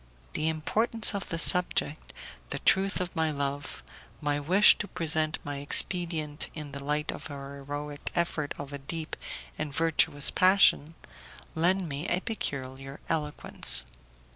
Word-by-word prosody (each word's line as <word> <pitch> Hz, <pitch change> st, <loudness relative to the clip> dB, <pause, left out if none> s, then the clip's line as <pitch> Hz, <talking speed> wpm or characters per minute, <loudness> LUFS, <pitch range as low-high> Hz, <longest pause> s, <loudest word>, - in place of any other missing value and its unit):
The 155 Hz, -, 0 dB
importance 215 Hz, +8 st, +1 dB
of 200 Hz, -2 st, -4 dB
the 165 Hz, -, -2 dB
subject, 165 Hz, -3 st, +1 dB, 0.4 s
the -, -, -3 dB
truth 195 Hz, 0 st, +3 dB
of 180 Hz, 0 st, -4 dB
my 160 Hz, -1 st, +1 dB
love, 140 Hz, -1 st, -4 dB, 0.4 s
my 145 Hz, -1 st, -1 dB
wish 185 Hz, +8 st, +6 dB
to 205 Hz, -, -3 dB
present 160 Hz, -3 st, 0 dB
my 145 Hz, -1 st, -5 dB
expedient 155 Hz, +1 st, +1 dB
in 150 Hz, -3 st, -7 dB
the 140 Hz, 0 st, -7 dB
light 150 Hz, +2 st, -1 dB
of -, -, -9 dB
the 145 Hz, -, -8 dB
heroic 145 Hz, +1 st, -7 dB
effort 165 Hz, -4 st, -1 dB
of 145 Hz, 0 st, -8 dB
a 140 Hz, -, -5 dB
deep 155 Hz, +3 st, -5 dB, 0.4 s
and 150 Hz, -, -3 dB
virtuous 150 Hz, -2 st, +3 dB
passion, 185 Hz, -4 st, +4 dB, 0.6 s
lend 180 Hz, +3 st, +1 dB
me 145 Hz, +3 st, -4 dB
a 180 Hz, -, +2 dB
peculiar 135 Hz, -, -5 dB
eloquence. 150 Hz, -, +1 dB
155 Hz, 140 wpm, -28 LUFS, 145-175 Hz, 0.6 s, wish